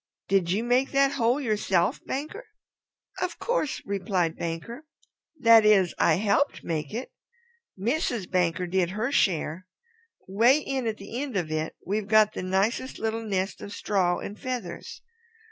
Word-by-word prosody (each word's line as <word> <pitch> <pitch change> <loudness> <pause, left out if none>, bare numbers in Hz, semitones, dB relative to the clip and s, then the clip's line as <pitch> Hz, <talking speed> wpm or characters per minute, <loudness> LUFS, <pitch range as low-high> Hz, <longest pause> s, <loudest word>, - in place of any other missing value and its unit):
Did 190 -3 +2
you 200 +6 +1
make 250 +3 +2
that 275 0 +4
hole 250 -1 +1
yourself, 210 -8 0
Banker?" 305 - -5 0.7
"Of 365 - -2
course," 480 - -1
replied 185 -4 -1
Banker. 230 - -6 0.5
"That 230 -3 +7
is, 200 -4 +4
I 160 - +4
helped 210 - +1
make 155 -3 -3
it. 240 +4 -5 0.7
Mrs. 235 - -1
Banker 180 -1 0
did 180 0 0
her 215 +7 -2
share. 180 - 0 0.6
'Way 230 +8 +4
in 270 -4 -3
at 220 -1 -2
the 230 +6 -6
end 275 -7 -3
of 165 -4 -2
it 155 0 -2
we've 205 +2 -2
got 215 0 +5
the - - -4
nicest 195 +8 -1
little 225 +1 -2
nest 195 -2 -2
of 205 - -7
straw 185 -5 0
and 205 - -7
feathers. 255 -2 -6
210 Hz, 150 wpm, -26 LUFS, 185-245 Hz, 0.7 s, That